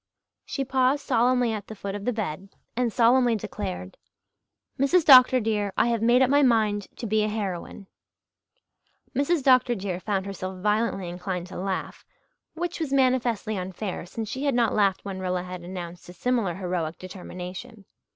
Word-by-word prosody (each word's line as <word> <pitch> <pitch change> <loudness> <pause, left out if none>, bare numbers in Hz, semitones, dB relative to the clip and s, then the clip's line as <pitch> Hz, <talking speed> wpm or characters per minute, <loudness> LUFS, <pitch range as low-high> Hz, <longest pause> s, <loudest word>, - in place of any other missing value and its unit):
She 275 - -3
paused 265 +2 +1
solemnly 245 0 +2
at 210 -2 -6
the 220 - -8
foot 200 -1 -5
of 205 0 -6
the 250 - +1
bed 195 -4 -4 0.3
and 245 -1 0
solemnly 240 +1 +4
declared, 90 - -5 0.8
"Mrs. 300 +5 +3
Dr. 255 -2 +8
dear, 210 -3 -1
I - - +3
have 230 -2 0
made 240 +3 +5
up 260 - +2
my 285 +1 +5
mind 215 -6 +2
to - - -6
be 215 0 +1
a 210 - +1
heroine." 200 -2 -4 1.3
"Mrs. 285 +3 +1
Dr. 255 -2 +4
dear" 190 -3 -4
found 195 -1 -2
herself 185 -1 -6
violently 210 -1 0
inclined 180 0 -4
to - - -9
laugh 190 0 -4 0.5
which 345 +1 -3
was 315 -4 -3
manifestly 250 -5 +1
unfair, 185 0 -5
since 220 +4 -5
she 260 +6 -4
had 280 -3 +1
not 235 -2 +2
laughed 200 -2 +1
when 195 -1 -5
Rilla 180 -1 -2
had 180 -1 -7
announced 175 -1 -8
a - - -9
similar 230 -5 0
heroic 175 -4 -3
determination. 185 +2 -9
210 Hz, 170 wpm, -26 LUFS, 185-250 Hz, 1.3 s, Dr